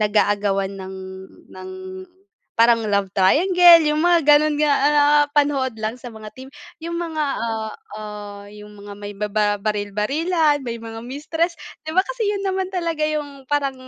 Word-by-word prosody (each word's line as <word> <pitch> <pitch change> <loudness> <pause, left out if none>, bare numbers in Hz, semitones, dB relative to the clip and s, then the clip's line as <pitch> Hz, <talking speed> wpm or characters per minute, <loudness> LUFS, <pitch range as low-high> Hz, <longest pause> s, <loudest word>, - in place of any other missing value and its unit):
nag-aagawan 205 -2 +1
ng 190 -1 -8 0.6
ng 375 - -9 0.8
parang 230 0 +3
love 200 -2 0
triangle 345 - +6
yung 305 +2 0
mga 350 -1 +5
gano'n 295 +1 +5
nga, 300 -1 +3
ah, 290 +2 +2 0.3
napapanood 285 -3 +1
lang 220 +2 -3
sa 245 -1 -10
mga 215 -1 -10
TV 260 +1 -10 0.4
yung 340 0 -4
mga, 320 -3 -2 0.2
ah, 220 -1 -3 0.2
ah, 210 -1 -8
yung 210 0 -13
mga 205 0 -10
may 205 0 -9
bababaril-barilan, 210 - 0
may 235 -2 -4
mga 225 0 -8
mistress, 315 +7 -3 0.3
'di 315 - -6
ba 375 - +4
kasi 480 -3 -3
yun 400 -1 -2
naman 380 -1 -1
talaga 335 -4 -2
yung 285 -3 -5
parang 280 -2 0
260 Hz, 150 wpm, -21 LUFS, 210-315 Hz, 0.8 s, triangle